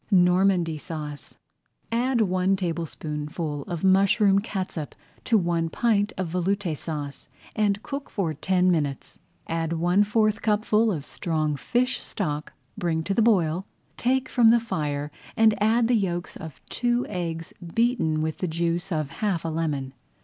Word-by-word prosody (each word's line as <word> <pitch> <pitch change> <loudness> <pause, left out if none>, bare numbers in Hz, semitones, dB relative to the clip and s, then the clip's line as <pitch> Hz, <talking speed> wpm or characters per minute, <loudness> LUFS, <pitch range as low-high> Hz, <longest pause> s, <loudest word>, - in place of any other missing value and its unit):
NORMANDY 180 -3 +3
SAUCE 150 -2 -7 0.6
Add 240 +1 +2
one 185 -1 +2
tablespoonful 155 -3 -3
of 175 -1 -4
mushroom 195 +1 +4
catsup 185 -7 -4 0.3
to 230 - +4
one 170 -3 0
pint 210 +1 +1
of 185 -3 -2
Veloute 180 0 0
Sauce 145 -2 -6 0.3
and 205 -1 +1
cook 280 0 -5
for 175 -6 -1
ten 180 +4 +2
minutes. 145 -5 -2 0.3
Add 165 0 -2
one 175 +4 +3
fourth 215 0 +1
cupful 215 +1 +2
of 150 -6 -3
strong 155 -3 -1
fish 245 - 0
stock, 150 -6 -3 0.2
bring 160 -2 -1
to 195 - -1
the 225 - +2
boil, 185 -5 +2 0.3
take 260 +2 +1
from 235 -3 +5
the 235 +1 +6
fire 150 -9 -3 0.3
and 220 -1 +6
add 225 +2 +3
the 245 - +2
yolks 180 -5 -1
of 155 -6 -9
two 245 0 +1
eggs 165 -4 -4 0.2
beaten 230 -10 +2
with 160 0 -3
the 185 - -1
juice 170 +3 -1
of 155 -4 -1
half 195 -6 0
a - - 0
lemon. 150 -5 -2
180 Hz, 150 wpm, -25 LUFS, 160-210 Hz, 0.6 s, the